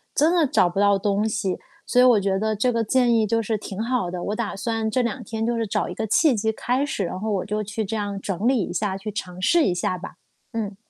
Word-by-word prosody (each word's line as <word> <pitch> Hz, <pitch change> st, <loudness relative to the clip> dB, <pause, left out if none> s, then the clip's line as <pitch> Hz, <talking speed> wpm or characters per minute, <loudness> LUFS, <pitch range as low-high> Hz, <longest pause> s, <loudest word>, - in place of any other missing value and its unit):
真 310 Hz, +4 st, +4 dB
的 335 Hz, -4 st, +3 dB
找 180 Hz, -8 st, +3 dB
不 185 Hz, +3 st, -3 dB
到 200 Hz, -1 st, +4 dB
东 205 Hz, +2 st, 0 dB
西， 200 Hz, -4 st, -1 dB, 0.3 s
所 250 Hz, -, +3 dB
以 -, -, +7 dB
我 245 Hz, -4 st, +6 dB
觉 195 Hz, 0 st, 0 dB
得 220 Hz, 0 st, 0 dB
这 245 Hz, +5 st, +1 dB
个 230 Hz, -1 st, 0 dB
建 245 Hz, +1 st, +3 dB
议 220 Hz, -2 st, +3 dB
就 230 Hz, +2 st, +1 dB
是 220 Hz, 0 st, -1 dB
挺 205 Hz, 0 st, -5 dB
好 240 Hz, -6 st, 0 dB
的， 175 Hz, 0 st, -5 dB
我 205 Hz, -, -2 dB
打 225 Hz, -2 st, -3 dB
算 225 Hz, +1 st, -1 dB
这 255 Hz, +3 st, +1 dB
两 240 Hz, +2 st, -2 dB
天 225 Hz, 0 st, -3 dB
就 235 Hz, 0 st, 0 dB
是 225 Hz, -2 st, -1 dB
找 -, -, -1 dB
一 -, -, -5 dB
个 220 Hz, -, -3 dB
契 315 Hz, -, +4 dB
机 220 Hz, +1 st, 0 dB
开 255 Hz, +5 st, 0 dB
始， 245 Hz, -8 st, -2 dB
然 180 Hz, +1 st, -4 dB
后 215 Hz, +2 st, -3 dB
我 190 Hz, -, -1 dB
就 210 Hz, +1 st, -2 dB
去 215 Hz, +2 st, -3 dB
这 220 Hz, +2 st, -3 dB
样 205 Hz, -1 st, -3 dB
整 195 Hz, +3 st, -2 dB
理 255 Hz, -3 st, +3 dB
一 -, -, -5 dB
下， 190 Hz, +1 st, -1 dB
去 195 Hz, +2 st, -6 dB
尝 185 Hz, -3 st, -6 dB
试 335 Hz, -, +4 dB
一 180 Hz, -, +1 dB
下 180 Hz, +1 st, -1 dB
吧。 180 Hz, -, -8 dB, 0.4 s
嗯。 210 Hz, -3 st, -3 dB
215 Hz, 295 characters per minute, -23 LUFS, 195-235 Hz, 0.4 s, 以